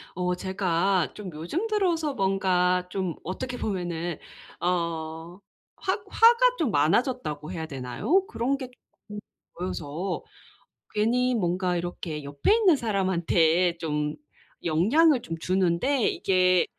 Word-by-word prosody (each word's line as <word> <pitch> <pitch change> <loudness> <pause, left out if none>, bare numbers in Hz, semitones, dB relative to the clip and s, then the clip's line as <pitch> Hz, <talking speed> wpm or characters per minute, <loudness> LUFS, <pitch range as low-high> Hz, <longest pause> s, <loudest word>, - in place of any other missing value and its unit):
어 180 0 0
제가 185 -1 0
좀 205 -3 -7
요즘 175 - -3
들어서 345 -8 0
뭔가 185 -2 +2
좀 185 -4 -2
어떻게 245 +8 -4
보면은 175 -6 -3 0.4
어 170 0 -3 0.4
확 395 +2 -1
화가 475 +4 +5
좀 305 - +1
많아졌다고 160 - 0
해야 160 -3 -4
되나요? 160 - 0
그런 275 - -1
게 260 -2 -6 0.4
쪼끔 210 0 -6 0.4
보여서 175 0 -4 0.7
괜히 245 +4 +2
뭔가 180 -2 0
이렇게 170 -3 -5
옆에 140 - 0
있는 405 -8 +5
사람한테 180 - +2
좀 150 -2 -2 0.5
영향을 240 - +3
좀 165 -4 -6
주는데 185 - +1
이게 185 -1 +3
185 Hz, 235 characters per minute, -26 LUFS, 170-245 Hz, 0.7 s, 화가